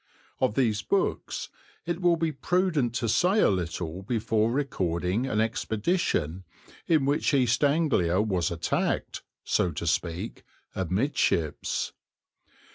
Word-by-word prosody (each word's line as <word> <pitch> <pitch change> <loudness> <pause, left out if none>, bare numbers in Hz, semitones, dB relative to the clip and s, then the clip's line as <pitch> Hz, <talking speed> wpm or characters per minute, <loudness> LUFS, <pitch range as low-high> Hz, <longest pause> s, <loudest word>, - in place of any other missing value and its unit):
Of 105 - +1
these 110 -6 +2
books 195 - -1 0.4
it 170 +1 -3
will 175 -1 +4
be 165 -1 0
prudent 150 -4 0
to 120 -1 -1
say 180 - +3
a - - +5
little 85 -1 -3
before 110 +1 0
recording 95 - -1
an 110 - 0
expedition 110 - 0 0.4
in 155 -5 +3
which 145 +1 +2
East 125 0 +2
Anglia 140 - +2
was 95 -5 +1
attacked, 85 -1 -1 0.2
so 90 - +1
to 80 - -4
speak, 85 +5 -2 0.3
amidships. 95 - 0
115 Hz, 120 wpm, -27 LUFS, 90-145 Hz, 0.4 s, a